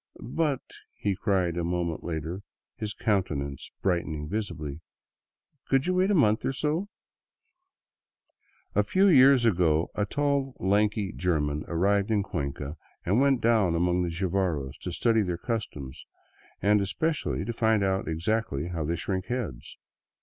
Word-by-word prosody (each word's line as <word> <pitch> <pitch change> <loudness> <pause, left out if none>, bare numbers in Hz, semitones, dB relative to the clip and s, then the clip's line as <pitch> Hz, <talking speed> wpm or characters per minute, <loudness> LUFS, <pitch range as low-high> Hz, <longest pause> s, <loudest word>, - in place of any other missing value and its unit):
" - - -21 0.2
But," 145 -5 +1 0.3
he 100 -2 -1
cried 90 -4 0
a 85 - 0
moment 85 -1 -2
later, 85 +3 -4 0.3
his 105 -1 -4
countenance 80 - -1
brightening 85 -5 -1
visibly, 85 -7 -4 0.4
" 140 - -52
could 135 0 +2
you 185 - +1
wait 185 +2 +2
a 205 - +3
month 110 - +3
or 135 - 0
so? 155 +8 -1 0.9
'* - - -43
A - - +4
few 195 +1 +3
years 135 -7 +7
ago 85 -6 +2
a 105 - -1
tall, 140 0 0
lanky 100 +1 +1
German 75 -6 -1
arrived 100 +4 +1
in 105 -3 +2
Cuenca 70 -3 -4 0.3
and 100 +8 +3
went 135 -3 +3
down 110 -7 +3
among 90 +1 +2
the 90 - 0
Jivaros 85 -5 -1
to - - -5
study 115 -2 +2
their 90 -4 -1
customs, 80 - -4 0.6
and 105 0 +4
especially 145 - -1
to 120 - -3
find 110 -2 +2
out 95 0 0
exactly 85 -2 -1
how 85 -3 -3
they 85 +3 -1
shrink 95 +2 -3
heads. 110 - -4
95 Hz, 150 wpm, -27 LUFS, 85-115 Hz, 0.9 s, years